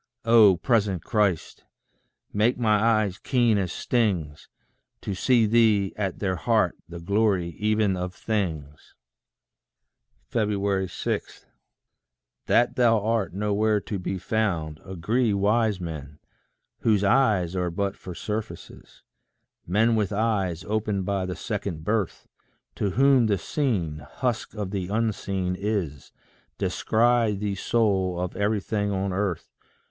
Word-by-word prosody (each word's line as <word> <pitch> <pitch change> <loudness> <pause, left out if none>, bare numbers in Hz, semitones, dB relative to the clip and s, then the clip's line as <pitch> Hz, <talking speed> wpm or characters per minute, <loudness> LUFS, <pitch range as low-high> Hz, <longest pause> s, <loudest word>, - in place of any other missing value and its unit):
Oh, 110 -5 +6
present 100 -2 +1
Christ! 105 - 0 0.7
make 110 +4 +2
my 110 -3 +2
eyes 110 -4 +2
keen 120 -5 +2
as 90 -3 -2
stings, 90 -14 -1 0.5
To 100 - -3
see 115 +4 +3
thee 110 -3 +3
at 95 -3 -2
their 95 -3 -1
heart, 110 -3 +1
the 85 0 -7
glory 100 -1 +1
even 105 -2 +1
of 90 0 -4
things. 80 -10 -4 1.4
6. 100 -3 -2 1.0
That 120 0 +3
thou 115 -3 +4
art 110 -6 0
nowhere 105 +1 +1
to 100 -1 -4
be 95 +1 -3
found, 85 -8 -1
agree 105 +5 0
Wise 105 0 +2
men, 75 -4 -7 0.6
whose 105 -3 +2
eyes 100 -6 +2
are 90 -1 0
but 100 +3 -2
for 90 -2 -9
surfaces; 105 +3 -7 0.6
Men 110 +6 +3
with 105 -2 0
eyes 100 -5 0
opened 105 -2 -1
by 95 -1 -1
the 90 - -4
second 100 -7 -4
birth, 105 -1 -2 0.5
To 100 - -1
whom 135 +1 +4
the 100 -2 +2
seen, 90 - -1
husk 115 - -3
of 105 -3 -4
the 95 -3 -3
unseen 100 -4 -1
is, 95 -9 -3 0.5
Descry 115 -1 +2
thee 100 0 -2
soul 95 -4 0
of 90 0 -3
everything 105 0 -1
on 95 -1 -1
earth. 95 -3 -3
100 Hz, 120 wpm, -25 LUFS, 90-110 Hz, 1.4 s, Oh